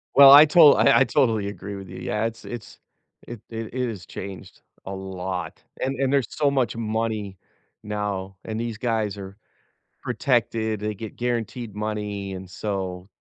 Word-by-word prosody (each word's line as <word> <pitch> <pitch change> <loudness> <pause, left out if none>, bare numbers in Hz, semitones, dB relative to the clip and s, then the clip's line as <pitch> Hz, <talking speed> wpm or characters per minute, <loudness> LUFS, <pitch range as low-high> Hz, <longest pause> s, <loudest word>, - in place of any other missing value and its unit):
Well, 140 0 +10
I 145 +2 +11
to 165 +3 +2
I 140 - +5
I 135 - +6
totally 115 -8 +1
agree 100 0 -6
with 95 -2 -9
you. 95 - -9
Yeah, 105 +1 -1
it's 115 0 -5
it's 120 -3 -8 0.5
it 120 -3 -8
it 115 0 -6
it 125 -2 -1
has 95 -6 -7
changed 95 -1 -9 0.2
a 95 - -5
lot, 95 -3 -5 0.2
and 135 +1 -1
and 135 -1 +1
there's 140 -5 +2
so 150 -2 +1
much 130 -4 0
money 110 -3 -2 0.5
now, 100 -2 -4
and 110 0 -4
these 115 -2 -3
guys 110 -3 -1
are 95 0 -9 0.7
protected, 115 -4 0
they 105 0 -2
get 110 +1 -8
guaranteed 120 -2 -3
money 105 -2 -3
and 95 -1 -8
so, 95 -2 -4
110 Hz, 170 wpm, -24 LUFS, 100-120 Hz, 0.7 s, I